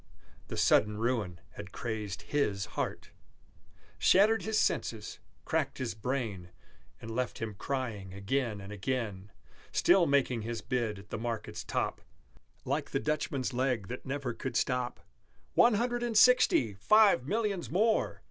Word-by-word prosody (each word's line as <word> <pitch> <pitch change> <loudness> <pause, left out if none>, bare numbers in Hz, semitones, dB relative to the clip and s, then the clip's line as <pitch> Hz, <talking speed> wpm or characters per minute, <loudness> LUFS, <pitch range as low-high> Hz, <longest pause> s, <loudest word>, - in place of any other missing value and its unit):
The - - -6
sudden 105 0 +3
ruin 110 -7 -1
had - - -9
crazed 105 -5 -4
his 105 -10 0
heart, - - -4 0.9
Shattered 215 +4 +5
his 220 0 -1
senses, 110 - -1 0.3
cracked - - -1
his 120 -4 -3
brain, 110 -5 -3 0.5
And 115 0 -7
left 125 -1 -2
him 110 -2 -4
crying 110 -4 -4
again 105 +3 -2
and 100 +1 -8
again, 105 -3 -3 0.4
Still 175 -1 +4
making 135 -4 +2
his 115 +1 -4
bid 115 -5 -1
at 100 +1 -13
the - - -3
market's 115 -1 -4
top - - -2 0.6
(Like - - -1
the - - -1
Dutchman's 135 0 -2
leg 125 -6 0
that 125 - -6
never 135 -2 -3
could 130 - -5
stop), 125 -1 -1 0.5
"One 240 -2 +5
Hundred 240 +2 0
and 235 -3 0
Sixty 215 - +5
Five 195 - +4
Millions 205 -3 -1
more!" 215 +6 +1
125 Hz, 140 wpm, -31 LUFS, 105-145 Hz, 0.9 s, Shattered